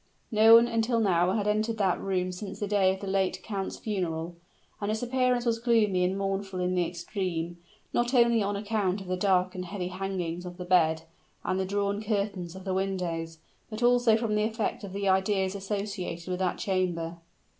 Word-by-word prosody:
No 220 +1 +8
one 230 +1 +7
until 230 0 +1
now 180 -3 +3
had 210 -2 0
entered 215 +2 0
that 190 -4 +1
room 185 -1 -1
since 195 +2 -7
the 210 - -1
day 195 -2 +3
of 190 - -5
the - - -5
late 190 -1 0
count's 195 -3 -4
funeral; 175 -5 -3 0.5
and 205 - -1
its 220 +2 -1
appearance 250 0 +1
was 230 -1 +1
gloomy 220 -6 +3
and 185 +2 0
mournful 195 -1 -2
in 180 0 0
the 180 -1 +2
extreme; 175 -1 -4 0.3
not 240 +2 +1
only 235 -2 +5
on 200 0 -1
account 200 -2 -1
of - - -8
the 185 - 0
dark, 185 -1 +2
heavy 180 0 -4
hangings 180 -2 -3
of 180 -1 -8
the 180 - -6
bed, 160 -3 +3 0.4
and 185 +1 -1
the 190 - 0
drawn 200 +1 -1
curtains 200 -5 -2
of 190 - -9
the 190 -1 -2
windows, 175 -4 -2 0.3
but 220 +2 -4
also 240 -2 +5
from 225 -2 -1
the 210 - +2
effect 220 -1 -2
of 200 - -6
the 200 0 -2
ideas 190 0 +2
associated 195 -3 -4
with 180 - -2
that 185 -1 0
chamber. 175 -3 -1
195 Hz, 195 wpm, -28 LUFS, 180-215 Hz, 0.5 s, No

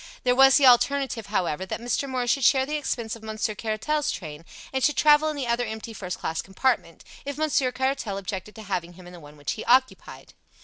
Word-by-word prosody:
There 250 -1 +3
was 270 +1 +6
the 285 - +4
alternative, 255 -2 +3
however, 185 -4 -1
that 190 - -5
Mr. 245 +4 -2
Moore 255 -1 -1
should 260 +3 +1
share 265 +2 +4
the 295 - -6
expense 235 -7 -3
of 230 - -14
Monsieur 220 0 -3
Caratal's 225 +8 -2
train, 155 -2 -8 0.3
and 265 -1 -1
should 295 -4 +2
travel 300 +2 +5
in 305 - -4
the 280 -3 -3
other 235 +1 0
empty 220 +1 -7
first 180 -4 -5
class 160 - -3
compartment, 195 +7 -1 0.2
if 285 0 -5
Monsieur 290 -4 +1
Caratal 260 -6 -2
objected 195 +1 -6
to 220 - -10
having 180 -4 -4
him 180 +1 -15
in 175 - -12
the 175 - -11
one 150 -1 -14
which 145 - -3
he 220 - -5
occupied. 260 +2 0
235 Hz, 220 wpm, -25 LUFS, 195-270 Hz, 0.3 s, was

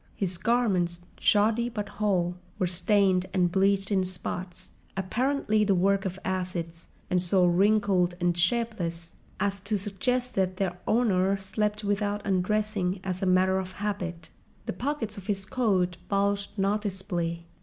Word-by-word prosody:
His 180 -3 -2
garments, 185 -7 +1 0.2
shoddy 220 +3 +3
but 210 -4 -4
whole, 185 -5 0 0.2
were 190 - +1
stained 185 +1 +2
and 180 -2 +3
bleached 195 +1 +2
in 190 -2 +3
spots, 185 0 -6 0.3
apparently 215 +2 +1
the 200 -2 +3
work 195 +2 +2
of 190 0 -3
acids, 180 -3 -3 0.2
and 180 -1 +3
so 180 +1 +6
wrinkled 185 -1 +3
and 175 -1 +1
shapeless 175 -4 -1 0.3
as 200 -1 0
to 205 +2 -1
suggest 250 +6 -1
that 185 -1 0
their 185 -2 -1
owner 200 -4 +2
slept 210 +2 -2
without 205 0 -1
undressing 195 0 0
as 185 -1 -3
a 190 - 0
matter 185 +1 +3
of 185 0 -6
habit. 185 -5 -4 0.3
The - - -3
pockets 230 -1 -3
of 190 - -13
his 195 -2 -2
coat 190 -7 +1
bulged 200 0 +1
noticeably. 190 -4 -1
195 Hz, 145 wpm, -27 LUFS, 180-210 Hz, 0.3 s, so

